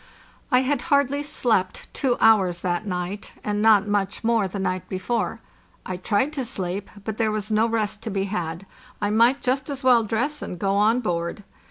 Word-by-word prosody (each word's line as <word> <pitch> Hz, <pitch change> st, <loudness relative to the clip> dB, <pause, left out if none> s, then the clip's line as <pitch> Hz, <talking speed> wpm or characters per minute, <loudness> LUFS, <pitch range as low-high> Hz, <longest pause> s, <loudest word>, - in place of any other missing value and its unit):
I 250 Hz, 0 st, +5 dB
had 265 Hz, 0 st, 0 dB
hardly 280 Hz, -1 st, +3 dB
slept 240 Hz, -10 st, -1 dB
two 255 Hz, -3 st, 0 dB
hours 190 Hz, -6 st, +4 dB
that 180 Hz, +3 st, -1 dB
night, 180 Hz, +2 st, -4 dB
and 210 Hz, 0 st, -1 dB
not 215 Hz, -2 st, +5 dB
much 205 Hz, 0 st, -1 dB
more 225 Hz, -3 st, +2 dB
the 190 Hz, -, -6 dB
night 185 Hz, -2 st, -2 dB
before. 225 Hz, +4 st, -2 dB, 0.4 s
I 185 Hz, -, -4 dB
tried 210 Hz, +10 st, 0 dB
to 275 Hz, -3 st, -2 dB
sleep, 195 Hz, -4 st, -3 dB
but 220 Hz, 0 st, -4 dB
there 225 Hz, -2 st, +1 dB
was 215 Hz, 0 st, -3 dB
no 215 Hz, +2 st, +3 dB
rest 215 Hz, -2 st, -1 dB
to 225 Hz, -, -4 dB
be 195 Hz, -2 st, -1 dB
had; 180 Hz, -2 st, -4 dB, 0.3 s
I 205 Hz, -, 0 dB
might 235 Hz, +5 st, +3 dB
just 265 Hz, +2 st, 0 dB
as 275 Hz, -1 st, -5 dB
well 250 Hz, -2 st, +6 dB
dress 240 Hz, +8 st, -1 dB
and 180 Hz, -, -5 dB
go 195 Hz, +2 st, 0 dB
on 220 Hz, +4 st, +3 dB
board. 170 Hz, -1 st, -2 dB
215 Hz, 190 wpm, -24 LUFS, 195-245 Hz, 0.4 s, well